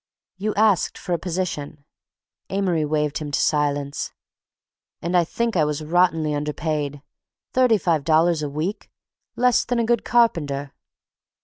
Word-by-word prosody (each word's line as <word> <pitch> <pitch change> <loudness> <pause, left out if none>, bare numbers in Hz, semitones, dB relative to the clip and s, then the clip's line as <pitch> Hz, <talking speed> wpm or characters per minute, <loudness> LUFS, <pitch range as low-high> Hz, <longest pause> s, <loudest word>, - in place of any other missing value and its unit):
"You 210 +2 -2
asked 210 -5 +2
for 185 -3 -4
a 170 - 0
position—" 160 -5 -4 0.6
Amory 185 -5 0
waved 150 -1 0
him 150 -2 -5
to 145 - 0
silence. 145 -1 0 0.9
"And 175 +2 -2
I 175 - +5
think 230 +6 -2
I 160 - +4
was 150 0 -2
rottenly 165 -2 +2
underpaid. 150 -1 -3 0.5
Thirty 250 -4 +4
five 165 -6 0
dollars 165 +1 +3
a 150 - -2
week—less 200 - -2
than 245 - -1
a 235 - +1
good 235 +1 +1
carpenter." 145 - +1
160 Hz, 135 wpm, -23 LUFS, 150-195 Hz, 0.9 s, I